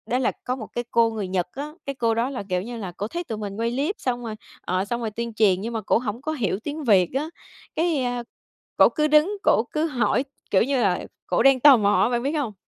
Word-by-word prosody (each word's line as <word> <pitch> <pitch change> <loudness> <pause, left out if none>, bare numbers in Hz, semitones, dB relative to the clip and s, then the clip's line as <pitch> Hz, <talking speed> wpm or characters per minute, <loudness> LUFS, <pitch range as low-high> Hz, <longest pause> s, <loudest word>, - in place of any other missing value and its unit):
Đó 245 - 0
là 260 - +1
có 250 - -1
một 225 -5 -7
cái 240 - -2
cô 230 -1 +4
người 215 -4 -4
Nhật 185 -1 -1
á, 295 +3 -6
cái 275 - -4
cô 230 -3 +1
đó 230 +3 0
là, 260 -6 -5
kiểu 180 -1 0
như 235 +4 -6
là, 195 -5 -5
cổ 205 - -3
thấy 345 +9 -4
tụi 225 -10 -5
mình 205 -2 -5
quay 230 +1 0
clip 285 +11 -1
xong 245 -1 -2
rồi, 220 -2 -5 0.3
ờ, 185 +2 -1
xong 240 +3 -3
rồi 225 -2 -3
tuyên 235 +1 -4
truyền, 200 -4 +3
nhưng 230 +3 -4
mà 225 - -2
cổ 195 - +2
hổng 230 0 -4
có 310 - -3
hiểu 210 - -1
tiếng 300 +1 -4
Việt 195 -8 +4
á, 290 +4 -1 0.5
cái, 320 -4 +1
a, 245 -1 -2 0.5
cổ - - +7
cứ 305 0 +1
đứng 305 +7 +3
cổ 225 - +4
cứ 310 +1 0
hỏi, 245 -3 +1 0.3
kiểu 195 - +4
như 265 +1 0
là, 190 -5 +1 0.2
cổ 180 - +2
đang 270 -1 +6
tò 275 0 +8
mò 205 -2 +3
á, - - +2
bạn 240 -1 -1
biết 280 - 0
hông? 280 -9 -2
235 Hz, 270 wpm, -24 LUFS, 210-275 Hz, 0.5 s, tò